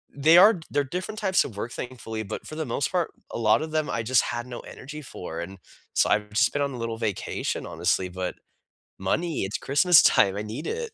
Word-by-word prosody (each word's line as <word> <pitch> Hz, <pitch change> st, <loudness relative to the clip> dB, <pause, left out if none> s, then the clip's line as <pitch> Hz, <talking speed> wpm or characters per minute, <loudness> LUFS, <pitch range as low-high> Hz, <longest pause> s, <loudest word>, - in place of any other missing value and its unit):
they 155 Hz, +4 st, +6 dB
are 205 Hz, 0 st, +7 dB
they're 145 Hz, -, +2 dB
different 180 Hz, +9 st, -5 dB
types 190 Hz, -3 st, +3 dB
of 115 Hz, -, -8 dB
work, 115 Hz, +4 st, -4 dB
thankfully. 115 Hz, -4 st, -6 dB
But 100 Hz, -, -7 dB
for 155 Hz, -, -7 dB
the 160 Hz, 0 st, -3 dB
most 140 Hz, -, -1 dB
part, 180 Hz, -2 st, 0 dB, 0.2 s
a -, -, -4 dB
lot 115 Hz, +3 st, +3 dB
of 155 Hz, 0 st, -5 dB
them, 155 Hz, -1 st, 0 dB
I 115 Hz, +3 st, -1 dB
just 125 Hz, +2 st, +3 dB
had 120 Hz, 0 st, -4 dB
no 120 Hz, -1 st, -7 dB
energy 150 Hz, +3 st, -9 dB
for. 85 Hz, -9 st, -7 dB
And 95 Hz, +3 st, -7 dB, 0.3 s
so -, -, +3 dB
I've 105 Hz, 0 st, +1 dB
just 120 Hz, +4 st, +3 dB
been 145 Hz, -, 0 dB
on 140 Hz, -, -1 dB
a -, -, -6 dB
little 115 Hz, -1 st, -3 dB
vacation, 110 Hz, -4 st, -3 dB
honestly, 95 Hz, -1 st, 0 dB
but 90 Hz, 0 st, -4 dB, 0.6 s
money, 155 Hz, -, -1 dB
it's 95 Hz, -, -2 dB
Christmas 165 Hz, +4 st, +5 dB
time. 100 Hz, -1 st, +4 dB
I 105 Hz, -, -2 dB
need 110 Hz, +9 st, -6 dB
it. 470 Hz, -1 st, -3 dB
125 Hz, 225 wpm, -26 LUFS, 105-155 Hz, 0.6 s, are